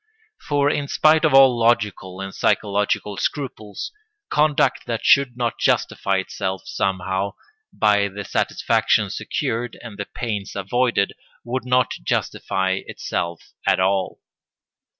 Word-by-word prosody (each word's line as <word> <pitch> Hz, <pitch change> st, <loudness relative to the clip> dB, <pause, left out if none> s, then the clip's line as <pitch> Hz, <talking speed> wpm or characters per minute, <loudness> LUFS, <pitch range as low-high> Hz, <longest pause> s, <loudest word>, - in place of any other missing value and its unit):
For 145 Hz, -1 st, +3 dB
in 145 Hz, -1 st, 0 dB
spite 155 Hz, +2 st, +4 dB
of 150 Hz, -3 st, +4 dB
all 135 Hz, -2 st, +7 dB
logical 105 Hz, -5 st, +1 dB
and 95 Hz, 0 st, -6 dB
psychological 100 Hz, 0 st, 0 dB
scruples, 110 Hz, -8 st, -4 dB, 0.4 s
conduct 150 Hz, -1 st, +2 dB
that 115 Hz, -1 st, -3 dB
should 135 Hz, -3 st, +4 dB
not 120 Hz, -2 st, -2 dB
justify 100 Hz, -1 st, +1 dB
itself 95 Hz, 0 st, -3 dB
somehow 95 Hz, 0 st, -2 dB, 0.4 s
by 105 Hz, -2 st, +3 dB
the 100 Hz, +1 st, -7 dB
satisfactions -, -, +1 dB
secured 120 Hz, +1 st, -3 dB
and 110 Hz, -4 st, -9 dB
the 100 Hz, -, -2 dB
pains 105 Hz, -5 st, -4 dB
avoided 100 Hz, +1 st, +1 dB, 0.3 s
would 125 Hz, +2 st, -3 dB
not 125 Hz, 0 st, +3 dB
justify 95 Hz, +8 st, -1 dB
itself 85 Hz, -1 st, -4 dB, 0.2 s
at -, -, +4 dB
all. 95 Hz, 0 st, 0 dB
105 Hz, 120 wpm, -22 LUFS, 95-125 Hz, 0.4 s, all